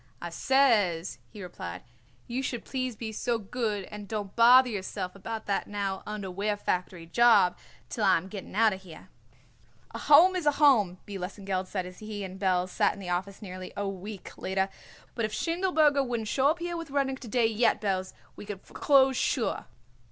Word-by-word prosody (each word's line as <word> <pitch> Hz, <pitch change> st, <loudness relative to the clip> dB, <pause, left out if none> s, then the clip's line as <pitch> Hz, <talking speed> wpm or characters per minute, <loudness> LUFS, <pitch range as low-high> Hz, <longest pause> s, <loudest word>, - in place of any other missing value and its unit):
"I 170 Hz, -, -6 dB
says," 205 Hz, -8 st, +2 dB
he 210 Hz, -3 st, -10 dB
replied, 90 Hz, -, -7 dB, 0.4 s
"you 245 Hz, +2 st, -3 dB
should 245 Hz, -3 st, -4 dB
please 255 Hz, -3 st, -3 dB
be 220 Hz, 0 st, -5 dB
so 235 Hz, +2 st, -1 dB
good 215 Hz, -1 st, -3 dB
and 210 Hz, -1 st, -8 dB
don't 205 Hz, -2 st, -5 dB
bother 250 Hz, +2 st, +7 dB
yourself 190 Hz, -3 st, -4 dB
about 220 Hz, +3 st, -6 dB
that 200 Hz, -, -1 dB
now 200 Hz, -2 st, -3 dB
underwear 205 Hz, 0 st, -3 dB
factory 180 Hz, -3 st, -3 dB
job 230 Hz, -1 st, +5 dB, 0.3 s
till 220 Hz, -, -3 dB
I -, -, +5 dB
am 170 Hz, +3 st, -6 dB
getting 195 Hz, -1 st, -8 dB
out 220 Hz, -1 st, +4 dB
of 190 Hz, -, -8 dB
here." 175 Hz, -4 st, -13 dB, 0.8 s
"A -, -, -6 dB
Home 335 Hz, +6 st, +6 dB
is 350 Hz, -5 st, -1 dB
a 295 Hz, -, +5 dB
Home," 250 Hz, -, +4 dB
B. 200 Hz, -2 st, -6 dB
Lesengeld 190 Hz, 0 st, -3 dB
said 185 Hz, -2 st, -3 dB
as 180 Hz, 0 st, -10 dB
he 215 Hz, -1 st, -6 dB
and 190 Hz, 0 st, -7 dB
Belz 185 Hz, -2 st, +1 dB
sat -, -, +2 dB
in -, -, -12 dB
the 185 Hz, -2 st, -7 dB
office 190 Hz, +4 st, -3 dB
nearly 185 Hz, -1 st, -8 dB
a 200 Hz, 0 st, -1 dB
week 195 Hz, +1 st, -7 dB
later; 190 Hz, +1 st, -1 dB, 0.4 s
"but 230 Hz, -, -3 dB
if 215 Hz, 0 st, -2 dB
Schindelberger 320 Hz, -5 st, +2 dB
wouldn't 235 Hz, -4 st, -3 dB
show 270 Hz, +5 st, +2 dB
up 315 Hz, +3 st, +2 dB
here 345 Hz, 0 st, -4 dB
with 335 Hz, -2 st, -6 dB
Rudnik 270 Hz, -1 st, -1 dB
to 250 Hz, -, -9 dB
day 240 Hz, +1 st, +2 dB
yet, 225 Hz, +1 st, +2 dB
Belz, 190 Hz, -3 st, -2 dB, 0.2 s
we -, -, -9 dB
would 200 Hz, -2 st, -7 dB
foreclose 270 Hz, -2 st, +3 dB
sure." 245 Hz, -2 st, 0 dB
210 Hz, 190 wpm, -28 LUFS, 190-250 Hz, 0.8 s, bother